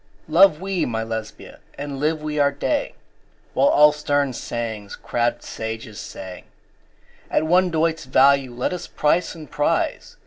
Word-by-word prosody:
Love 165 0 +5
we 190 -1 -1
(my 115 -2 -2
Lesbia!) 110 -1 -7 0.2
and 140 -1 -5
live 155 +1 0
we 150 -1 -2
our 140 0 +4
day, 280 - -2 0.6
While - - +3
all 150 - +6
stern 145 -2 0
sayings 110 -4 -5
crabbed 120 0 -1
sages 110 -1 -6
say, 95 -1 -9 0.8
At - - +1
one 180 +3 +3
doit's 165 -1 0
value 135 0 +4
let 125 +7 -2
us 180 -1 -6
price 165 +4 0
and 155 -2 -10
prize! 145 - -1
145 Hz, 145 wpm, -22 LUFS, 120-160 Hz, 0.8 s, all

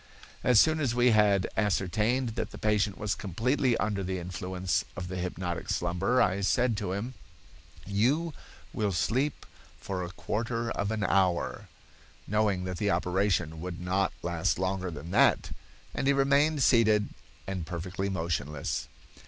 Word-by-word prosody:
"As 125 -3 +5
soon 160 0 +4
as 130 -6 0
we 120 0 +4
had 105 -3 +4
ascertained 110 +5 +1
that 115 - -3
the - - -10
patient 105 -2 +1
was 105 -1 -1
completely 120 - 0
under 105 -2 -1
the 95 0 -2
influence 90 +1 -2
of 90 0 -5
the 90 - -4
hypnotic 90 -1 -4
slumber, 90 +8 +1
I 95 +2 +2
said 110 +6 +2
to 100 -3 -2
him: 110 +6 -4 0.7
'You 130 - +1 0.4
will 105 -3 0
sleep 130 - 0 0.3
for 95 -2 -4
a 90 - -4
quarter 115 +5 -2
of 100 - -1
an 110 -1 -1
hour,' 95 -3 +1 0.6
knowing 105 -3 +1
that 90 -1 -4
the 105 +3 0
operation 90 -3 0
would 90 -1 -5
not 95 +2 0
last 85 -1 0
longer 95 0 -1
than 85 +1 -8
that; 120 +3 +3 0.4
and - - -1
he 140 - +5
remained 140 +2 +3
seated 110 -4 +4 0.4
and 95 -4 -4
perfectly 90 +2 -3
motionless. 80 -5 -2
100 Hz, 150 wpm, -29 LUFS, 90-115 Hz, 0.7 s, As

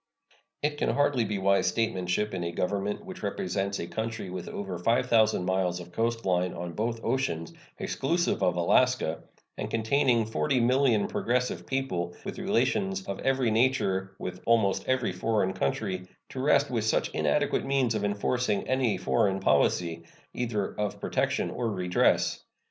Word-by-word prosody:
It 150 0 -1
can - - +1
hardly 145 -4 +2
be 105 0 -2
wise 100 +1 +2
statesmanship 105 -2 0
in 90 -2 -2
a 85 - -2
Government 100 - -2
which 190 -1 -8
represents 100 - -2
a - - -4
country 110 0 -4
with 90 -1 -6
over 95 -3 -5
5,000 110 -1 +3
miles 95 -1 0
of 90 0 -10
coast 115 +3 -1
line 90 -1 +1
on 85 0 -5
both 115 +3 -2
oceans, 115 -11 -1 0.2
exclusive 170 - 0
of 90 -3 +2
Alaska, 90 0 +2 0.4
and - - -3
containing 115 +1 +2
40,000,000 125 -1 +2
progressive 125 +1 -1
people, 90 -11 -2
with - - -5
relations 195 0 0
of - - -5
every 130 -3 +1
nature 100 -6 +1
with 90 0 -6
almost 110 -4 +2
every 130 -5 +1
foreign 95 +1 0
country, 95 -1 -2 0.2
to 130 - -7
rest 140 0 +3
with 115 -3 0
such 110 - +1
inadequate - - +1
means 135 -4 +2
of 105 -2 -2
enforcing 105 +2 0
any 130 -6 +1
foreign 95 +1 +1
policy, 85 -3 +2 0.3
either 115 -5 -2
of 105 -1 -2
protection - - 0
or 120 -2 -2
redress. 90 -3 +1
110 Hz, 150 wpm, -28 LUFS, 95-130 Hz, 0.4 s, 5,000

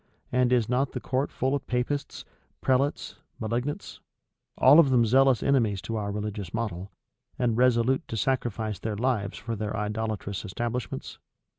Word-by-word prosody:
And 125 0 +2
is 120 -4 +3
not 130 +2 0
the 125 - -3
court 130 +3 -1
full 130 +2 -1
of 145 - -2
Papists, 125 +4 -2 0.3
prelates, 135 +2 0 0.2
malignants; 120 +6 -3 0.6
all 140 +5 +7
of 155 -5 +6
them 120 -3 +4
zealous 130 +2 +4
enemies 115 -8 +2
to 115 - -4
our 105 -2 -2
religious 105 -2 -4
model, 100 -4 -4 0.5
and 120 -3 +1
resolute 125 +1 +2
to 115 - -4
sacrifice 110 -4 -1
their 110 -2 -3
lives 115 -4 -1
for 115 +1 -4
their 105 +1 -3
idolatrous 105 -2 -3
establishments? 120 +4 -4
115 Hz, 150 wpm, -27 LUFS, 105-130 Hz, 0.6 s, all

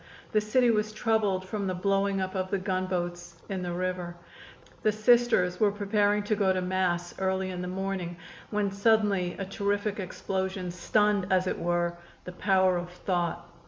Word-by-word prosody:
The 215 - +3
city 235 +3 +3
was 215 -1 0
troubled 215 -4 +1
from 200 -1 -3
the 185 - -1
blowing 195 +1 +1
up 185 0 -3
of 185 -1 -2
the 200 - +1
gunboats 185 -2 -2
in 190 -2 -2
the 175 -1 -3
river. 180 0 -3 0.7
The 215 - +3
Sisters 215 -5 +3
were 210 -2 +4
preparing 205 0 +1
to 215 +1 0
go 200 -2 +2
to 185 - +1
Mass 180 -1 -1
early 190 0 0
in 180 -1 -4
the 180 - -4
morning 185 -2 -3 0.3
when 210 -2 0
suddenly 200 -3 +2
a 195 - -3
terrific 205 +1 -1
explosion 190 -1 -3
stunned, 205 +2 +1
as 185 -1 +3
it - - -2
were, 175 0 0 0.3
the 180 - -7
power 185 0 +3
of 175 0 -4
thought. 175 -1 -2
190 Hz, 170 wpm, -28 LUFS, 180-205 Hz, 0.7 s, were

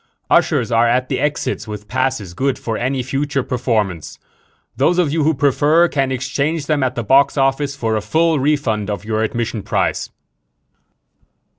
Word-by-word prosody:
"Ushers - - +2
are 115 +1 +4
at 125 +2 +1
the - - -1
exits 145 -5 -2
with 105 -1 -7
passes 130 -8 -2
good 135 +6 -1
for 115 - -4
any 130 +3 -1
future 140 +1 -1
performance. 105 - -2 0.6
Those 175 +2 +2
of 165 -5 +1
you 160 -2 +1
who 160 +1 +2
prefer 145 +5 +3
can 135 -4 -1
exchange 140 +4 -2
them 150 -1 0
at 130 -1 0
the 120 - -2
box 135 +5 +3
office 135 +1 +1
for 115 -5 -1
a 110 - -1
full 160 +9 +1
refund 130 -8 0
of 105 0 -4
your 110 0 -1
admission 115 -1 -2
price." - - -1
130 Hz, 165 wpm, -18 LUFS, 115-145 Hz, 0.6 s, are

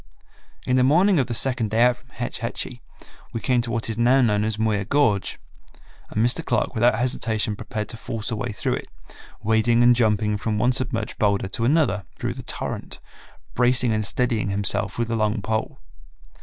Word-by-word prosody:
In 125 - +2
the 125 - +4
morning 175 +7 +4
of 130 - +1
the 120 - -3
second 120 -3 0
day 110 +3 +3
out 125 0 +4
from 125 0 -25
Hetch 120 -1 -5
Hetchy 120 +2 -5 0.5
we 115 - -2
came 125 0 +1
to 120 - -5
what 115 0 -2
is 115 0 -3
now 125 +3 +4
known 105 -4 +2
as 110 0 -1
"Muir 110 -2 0
Gorge," 110 -4 +1 0.7
and 110 +2 +1
Mr. 120 - +1
Clark 120 - 0
without 120 +1 +3
hesitation 110 -3 0
prepared 105 0 -5
to 115 - -4
force 115 0 -4
a - - -1
way 120 +2 -3
through 105 - -2
it, - - -8 0.6
wading 110 +2 +3
and 120 0 +6
jumping 105 -2 +1
from 105 +1 -2
one 120 +4 +3
submerged 125 -3 -2
boulder 100 -2 +1
to 115 +4 0
another 140 -7 +2
through - - -3
the - - -8
torrent, - - -6 0.5
bracing 125 -1 +3
and 110 0 0
steadying 115 -1 0
himself 100 0 0
with 120 -1 -1
a - - +1
long 110 0 0
pole. 110 +1 -2
115 Hz, 195 wpm, -23 LUFS, 110-125 Hz, 0.7 s, and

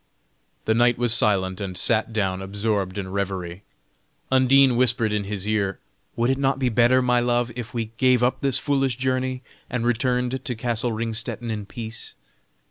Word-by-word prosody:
The 110 - +2
knight 120 +1 +3
was 120 -2 +2
silent, 95 -4 +1
and 95 -2 -4
sat 115 +3 +1
down 95 -4 -1
absorbed 100 -1 -2
in 95 -2 -4
revery. 95 -2 -3 0.7
Undine 130 0 +5
whispered 120 -3 +2
in 105 -1 -1
his 100 0 -3
ear: 100 -3 0 0.4
"Would 120 +2 +1
it 135 - -1
not 135 -1 +1
be 130 -2 0
better, 120 +2 +3
my 125 -1 +3
love, 120 0 0
if 125 -1 -6
we 115 -2 -3
gave 130 -2 +3
up 125 - +1
this 135 -3 +2
foolish 135 -3 0
journey, 130 0 -1 0.3
and 125 -2 -2
returned 125 +1 0
to 125 -4 -3
castle 120 +1 -1
Ringstetten 115 +1 -3
in 105 -2 -5
peace?" 115 +1 -7
120 Hz, 170 wpm, -23 LUFS, 105-125 Hz, 0.7 s, Undine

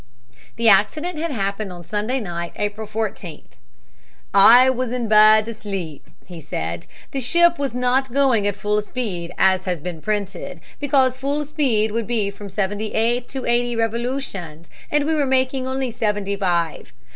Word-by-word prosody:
The 230 0 +1
accident 300 - +3
had 335 +1 -2
happened 200 -5 -3
on 175 -1 -9
Sunday 210 +9 -2
night, 170 -5 -5
April 210 +1 -3
14th. 210 -6 -5 0.8
"I 235 +6 +8
was 255 -2 0
in 245 -2 -2
bed 215 0 +6
and - - -4
asleep," 195 -8 -6 0.2
he 175 -2 -10
said. 85 - -5 0.2
"The 275 - -3
ship 340 +6 +3
was 275 -4 -2
not 250 +1 +1
going 255 -6 +2
at 205 - -1
full 210 0 0
speed, 205 -7 -4
as 190 -1 +3
has 180 -3 -2
been 165 0 -6
printed, 200 -4 -3 0.2
because 265 -3 +2
full 285 +3 -2
speed 260 -8 0
would 230 0 -2
be 215 -4 0
from 200 0 -10
seventy 205 +2 -3
eight 240 +2 +1
to 265 -1 -5
eighty 240 0 +1
revolutions, 225 - -3 0.2
and 295 -1 +1
we 320 - +1
were 295 -3 +1
making 260 0 0
only 260 -1 -2
seventy 205 -3 -1
five. 175 -5 -1
220 Hz, 165 wpm, -21 LUFS, 195-260 Hz, 0.8 s, I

